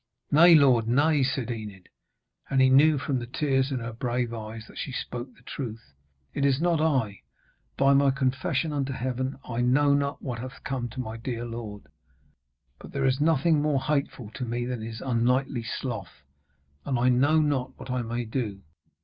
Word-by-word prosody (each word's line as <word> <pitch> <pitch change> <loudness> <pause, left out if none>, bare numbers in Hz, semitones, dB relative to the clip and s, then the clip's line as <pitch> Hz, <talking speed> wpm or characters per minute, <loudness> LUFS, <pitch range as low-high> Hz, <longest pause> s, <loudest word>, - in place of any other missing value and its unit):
'Nay, 165 +3 +8
lord, 130 -7 +5
nay,' 145 +5 +3
said 130 -2 -1
Enid, 105 -5 -7 0.6
and 135 - +1
he 130 0 +5
knew 150 +3 +6
from 135 -1 -1
the 120 - -6
tears 135 +1 0
in 135 - -1
her 115 0 -5
brave 120 0 -2
eyes 110 0 -7
that - - -12
she 135 - -4
spoke 125 0 -5
the - - -23
truth. 115 - -7 0.4
'It 140 - -2
is 140 -1 +3
not 170 -1 +2
I, 130 - 0 0.6
by 135 0 +4
my 140 0 +4
confession 135 +3 0
unto 140 -2 -1
Heaven! 130 +1 -3
I 120 -1 -2
know 140 +4 +3
not 140 0 0
what 125 -3 -5
hath 130 +2 -8
come 125 -3 -3
to 130 - -9
my 110 -2 -4
dear 120 0 -4
lord. 115 -3 -7 1.0
But - - -12
there 135 -1 0
is 135 +1 +1
nothing 155 0 +3
more 150 -2 +1
hateful 135 -6 -2
to 130 - -6
me 120 0 -2
than 125 -2 -4
his 110 0 -7
unknightly 125 +1 +1
sloth! 120 +1 -5 0.6
And 135 -3 -1
I 125 +1 +3
know 140 +6 +4
not 145 -4 -1
what 130 - -8
I 125 0 0
may 120 +1 -3
do. 110 -4 -4
130 Hz, 185 wpm, -27 LUFS, 120-140 Hz, 1.0 s, Nay